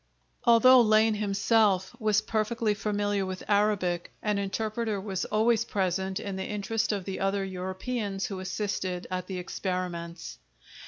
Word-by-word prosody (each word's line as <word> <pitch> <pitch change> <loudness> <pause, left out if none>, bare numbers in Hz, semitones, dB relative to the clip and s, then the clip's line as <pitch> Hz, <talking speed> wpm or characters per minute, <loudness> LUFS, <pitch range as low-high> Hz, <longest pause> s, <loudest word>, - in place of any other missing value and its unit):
Although 245 +2 +7
Lane 220 0 +4
himself 205 -1 +2
was 215 -2 +2
perfectly 220 0 0
familiar 205 -1 -1
with 185 0 -5
Arabic, 200 -4 +1
an 210 -1 +1
interpreter 215 +2 -2
was 190 -2 -3
always 225 +1 +2
present 190 -2 -1
in 200 -2 -5
the 190 - -3
interest 215 +2 -1
of 200 -3 -3
the 195 - -4
other 195 0 0
Europeans 195 +2 -3
who 195 -2 -5
assisted 185 -1 -3
at 185 0 -3
the 190 - -4
experiments. 180 - -4
200 Hz, 140 wpm, -28 LUFS, 190-215 Hz, -, Although